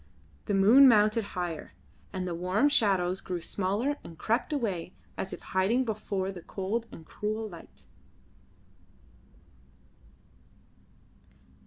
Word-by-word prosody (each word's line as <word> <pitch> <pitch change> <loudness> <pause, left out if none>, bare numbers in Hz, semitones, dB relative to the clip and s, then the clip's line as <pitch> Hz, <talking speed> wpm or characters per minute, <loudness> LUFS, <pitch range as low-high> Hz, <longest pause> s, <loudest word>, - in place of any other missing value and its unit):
The 205 - 0
moon 230 +8 +8
mounted 215 -1 +4
higher, 175 -3 -4 0.4
and 185 -1 -3
the 175 - -2
warm 185 +11 +2
shadows 190 -8 +2
grew 180 -1 -4
smaller 200 - -1
and 165 - -11
crept 230 - 0
away 200 - -2 0.2
as 190 - -4
if - - -7
hiding 210 +8 +1
before 200 -3 -2
the 180 -3 -9
cold 205 +7 -3
and 160 - -11
cruel 215 +4 -3
light. 170 -5 -13
200 Hz, 115 wpm, -29 LUFS, 185-225 Hz, 0.4 s, moon